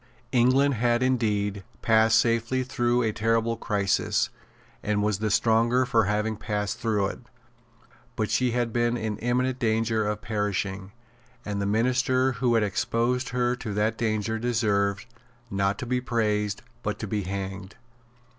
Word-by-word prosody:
England 130 +3 +4
had 120 +1 +1
indeed 105 -6 0 0.2
passed 110 -1 +4
safely 115 +2 +1
through 120 -1 +1
a 110 - +1
terrible 115 +2 +1
crisis, 100 -4 0 0.5
and 105 0 0
was 105 -2 0
the 110 0 0
stronger 115 +4 +3
for 115 -3 +2
having 105 +2 0
passed 105 -1 -3
through 110 -4 +1
it. 95 - -4 1.0
But 110 -1 -1
she 125 +3 +2
had 120 -1 -1
been 120 0 +1
in 110 -3 -3
imminent 125 +2 0
danger 110 -2 +1
of 105 0 -3
perishing; 100 -2 -2 0.5
and 100 -1 -3
the 100 - -1
minister 125 +4 +2
who 120 0 +1
had 115 - +3
exposed 120 +5 0
her 125 0 0
to 110 -5 -5
that 110 +2 +1
danger 110 -1 -1
deserved, 105 -4 0 0.5
not 100 0 0
to - - -5
be 125 +1 -1
praised, 105 -4 -1 0.2
but - - -3
to - - -5
be 105 - -2
hanged. 95 +1 -5
110 Hz, 150 wpm, -26 LUFS, 105-120 Hz, 1.0 s, England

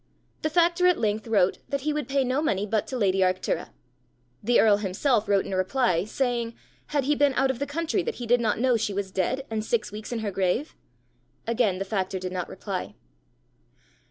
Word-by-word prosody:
The 310 - 0
factor 345 +2 +3
at 360 - +4
length 215 +1 -1
wrote 200 -5 +2
that 280 -1 -1
he 300 +2 0
would 295 -4 -3
pay 275 0 +2
no 260 +3 0
money 205 -10 0
but 215 0 -1
to 260 - -4
lady 195 -4 +2
Arctura. 185 0 0 0.7
The 240 +3 +3
earl 210 -2 +5
himself 210 +3 0
wrote 200 -1 +3
in 195 - -5
reply, 185 -1 +1
saying 235 0 -1 0.3
had 290 -2 0
he 290 +3 +2
been 285 -2 +2
out 270 0 +3
of 250 - -7
the 285 - -2
country 325 +3 -1
that 470 - -3
he 240 - -6
did 240 +1 +3
not 220 -2 +1
know 250 -1 +3
she 210 -2 -2
was 195 -1 -3
dead 255 +9 -1
and 220 -1 -1
six 225 -1 -1
weeks 215 +2 -7
in 235 -2 -2
her 205 - -1
grave? 195 - -1 0.7
Again 230 -5 +1
the 195 - -3
factor 190 -2 -2
did 185 0 -5
not 180 -1 -3
reply. 190 -1 -5
225 Hz, 210 wpm, -26 LUFS, 195-270 Hz, 0.7 s, earl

